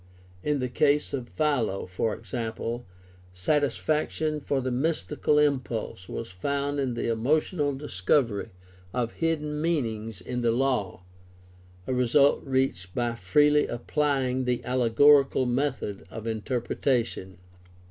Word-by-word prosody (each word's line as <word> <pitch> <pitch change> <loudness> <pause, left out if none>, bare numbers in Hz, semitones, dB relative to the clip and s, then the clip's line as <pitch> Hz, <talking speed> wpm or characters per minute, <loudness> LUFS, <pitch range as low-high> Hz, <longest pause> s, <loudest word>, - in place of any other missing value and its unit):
In 150 +5 0
the 125 -2 -1
case 145 +3 +2
of 130 -4 -4
Philo, 125 -11 0
for 95 +4 -2
example, 115 +2 -4 0.5
satisfaction 150 - 0
for 140 -1 -1
the 130 0 -2
mystical 150 +2 0
impulse 130 -10 0
was 115 -5 -5
found 140 +9 -2
in 130 -3 -1
the 120 - -2
emotional 145 +6 +1
discovery 115 -3 0 0.5
of 120 -2 0
hidden 150 -2 -1
meanings 115 - -1
in 125 +7 -4
the 120 -1 +2
law 120 -7 0 0.4
— 90 0 -26
a 130 - -2
result 125 +3 +4
reached 130 -10 -1
by 120 -1 0
freely 150 +4 +3
applying 130 0 0
the 125 -1 -1
allegorical 130 +3 +4
method 125 -5 -2
of 110 -1 -8
interpretation. 115 -3 -1
125 Hz, 120 wpm, -27 LUFS, 115-145 Hz, 0.5 s, result